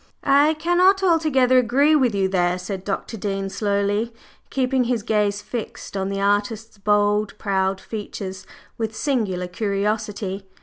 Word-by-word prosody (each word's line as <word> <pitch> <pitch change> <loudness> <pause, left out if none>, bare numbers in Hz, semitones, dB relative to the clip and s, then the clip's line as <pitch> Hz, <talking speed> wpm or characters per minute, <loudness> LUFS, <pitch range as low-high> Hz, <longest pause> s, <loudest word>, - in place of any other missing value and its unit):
"I 285 +3 +4
cannot 360 +4 +3
altogether 295 -8 +4
agree 275 +6 +3
with 250 -7 +2
you 195 -1 +2
there," 180 -1 +1
said 185 +1 -5
Dr. 205 +3 -4
Dean 195 -1 -3
slowly, 205 +2 0 0.4
keeping 260 -1 +1
his 235 -3 -1
gaze 205 -1 0
fixed 230 -2 -6
on 190 0 -1
the 195 0 -3
artist's 205 +2 -1
bold, 205 +1 +1
proud 190 0 0
features 195 -3 -7 0.3
with 220 -1 -2
singular 215 - -1
curiosity. 200 0 -2
210 Hz, 135 wpm, -22 LUFS, 195-250 Hz, 0.4 s, I